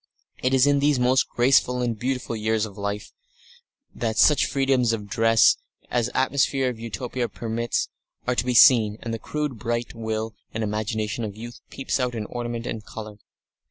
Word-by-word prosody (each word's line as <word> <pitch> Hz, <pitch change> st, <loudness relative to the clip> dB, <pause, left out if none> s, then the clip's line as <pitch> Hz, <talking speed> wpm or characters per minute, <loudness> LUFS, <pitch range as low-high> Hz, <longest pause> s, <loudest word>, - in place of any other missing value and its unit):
It 130 Hz, +1 st, +2 dB
is 130 Hz, 0 st, +5 dB
in 145 Hz, 0 st, +3 dB
these 145 Hz, 0 st, +3 dB
most 125 Hz, +1 st, +2 dB
graceful 125 Hz, 0 st, +3 dB
and 120 Hz, -2 st, -1 dB
beautiful 125 Hz, +1 st, -3 dB
years 110 Hz, 0 st, 0 dB
of 100 Hz, -3 st, -10 dB
life 100 Hz, +1 st, -4 dB, 0.8 s
that 110 Hz, -2 st, -2 dB
such 150 Hz, -, +5 dB
freedoms 135 Hz, -4 st, +2 dB
of 105 Hz, -2 st, -3 dB
dress 115 Hz, +2 st, +4 dB, 0.3 s
as 120 Hz, -1 st, +1 dB
the -, -, -6 dB
atmosphere 135 Hz, 0 st, +2 dB
of 120 Hz, -3 st, -6 dB
Utopia 120 Hz, +2 st, -4 dB
permits 115 Hz, 0 st, -2 dB, 0.4 s
are 125 Hz, -, +1 dB
to 120 Hz, -, +1 dB
be 125 Hz, -1 st, 0 dB
seen, 115 Hz, -6 st, +6 dB
and 115 Hz, -1 st, -4 dB
the 115 Hz, -, -3 dB
crude 150 Hz, -4 st, -4 dB
bright 120 Hz, +1 st, -2 dB
will 110 Hz, -1 st, -3 dB, 0.2 s
and 110 Hz, -, -1 dB
imagination 110 Hz, +1 st, -2 dB
of 105 Hz, -2 st, -5 dB
youth 120 Hz, +2 st, -9 dB
peeps 135 Hz, -, -2 dB
out 125 Hz, -2 st, -1 dB
in 110 Hz, -2 st, -3 dB
ornament 120 Hz, 0 st, -5 dB
and 110 Hz, -3 st, -4 dB
colour. 105 Hz, -1 st, -9 dB
120 Hz, 180 wpm, -24 LUFS, 110-125 Hz, 0.8 s, seen